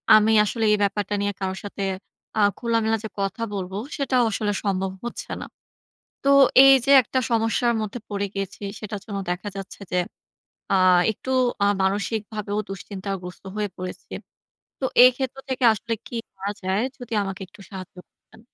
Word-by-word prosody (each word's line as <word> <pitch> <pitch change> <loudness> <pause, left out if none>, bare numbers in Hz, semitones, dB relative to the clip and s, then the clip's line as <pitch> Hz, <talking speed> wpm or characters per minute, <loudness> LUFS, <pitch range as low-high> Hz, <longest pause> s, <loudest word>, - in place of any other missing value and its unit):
আমি 215 +1 +5
আসলে 225 +2 -2
এই 210 - +4
ব্যাপারটা 200 0 -1
নিয়ে 205 0 0
কারোর 190 0 -2
সাথে, 200 0 -7 0.6
আ - - +2 0.2
খোলামেলা 225 -2 +1
যে 220 - -4
কথা 195 +4 -2
বলব, 190 -2 -4 0.3
সেটাও 260 -3 +2
আসলে 210 0 -1
সম্ভব 190 -1 0
হচ্ছে 240 - -6
না। - - -5 0.8
তো 275 - 0 0.4
এই 270 - +9
যে - - +1
একটা 260 +4 -2
সমস্যার 230 +1 +2
মধ্যে 215 +3 -4
পড়ে 205 -1 -2
গিয়েছি 195 +1 -5 0.2
সেটার 210 -2 -6
জন্য 200 -3 -4
দেখা 180 +3 -3
যাচ্ছে 195 +1 -8
যে, 180 - +1 0.8
আ - - +4 0.4
একটু 260 - -8 0.3
আ - - +4 0.2
মানসিকভাবেও 205 +1 -1
দুশ্চিন্তাগ্রস্ত 195 -1 -6
হয়ে 210 -1 -1
পড়েছি। 185 0 -7 0.7
তো - - -2 0.2
এই 255 - +9
ক্ষেত্র 265 0 -3
থেকে 260 -1 -1
আসলে 225 +2 -5
কি 240 - -6 0.2
করা 195 +1 -4
যায়, 190 +3 0 0.2
যদি 245 -2 -10
আমাকে 195 -1 -5
একটু 190 - -19
সাহায্য 190 -2 -8
করতেন? - - -22
205 Hz, 160 wpm, -24 LUFS, 195-225 Hz, 0.8 s, এই